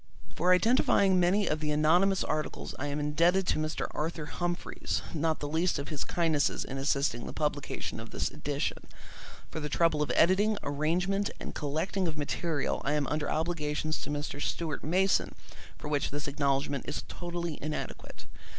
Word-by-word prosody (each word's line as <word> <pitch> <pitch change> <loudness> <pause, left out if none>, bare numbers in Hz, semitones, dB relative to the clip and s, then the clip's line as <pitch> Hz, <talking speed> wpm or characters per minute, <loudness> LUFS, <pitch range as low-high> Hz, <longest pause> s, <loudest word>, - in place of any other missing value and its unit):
For 180 +2 +2
identifying 195 -2 +4
many 190 +4 +3
of 155 - +1
the 150 0 -1
anonymous 175 +6 +4
articles 155 0 -3
I 145 - -2
am 145 +1 -2
indebted 170 +6 +3
to 180 - +1
Mr. 155 0 -1
Arthur 160 0 -3
Humphreys, 175 +3 -2
not 160 0 0
the 145 - -2
least 165 +4 +1
of 140 - -4
his 150 -3 -2
kindnesses 160 -4 +1
in 135 - -5
assisting 135 -3 0
the - - -6
publication 150 -2 -2
of - - -8
this - - -2
edition; - - -2 0.7
for - - -3
the 150 -1 -3
trouble 160 0 +2
of 150 - +1
editing, 200 +5 +4
arrangement, 175 +8 +1
and - - -6
collecting 160 +6 -1
of 160 -1 -3
material 150 0 -1
I 140 - +1
am 150 -1 +1
under 150 0 0
obligations 155 -1 -1
to - - -5
Mr. 145 0 -3
Stuart 160 -1 -2
Mason 185 +5 +2 0.4
for - - -7
which 145 -1 0
this 145 +1 -3
acknowledgment 140 -1 0
is - - -3
totally 175 -2 -4
inadequate. 155 +1 -5
155 Hz, 170 wpm, -30 LUFS, 145-175 Hz, 0.7 s, identifying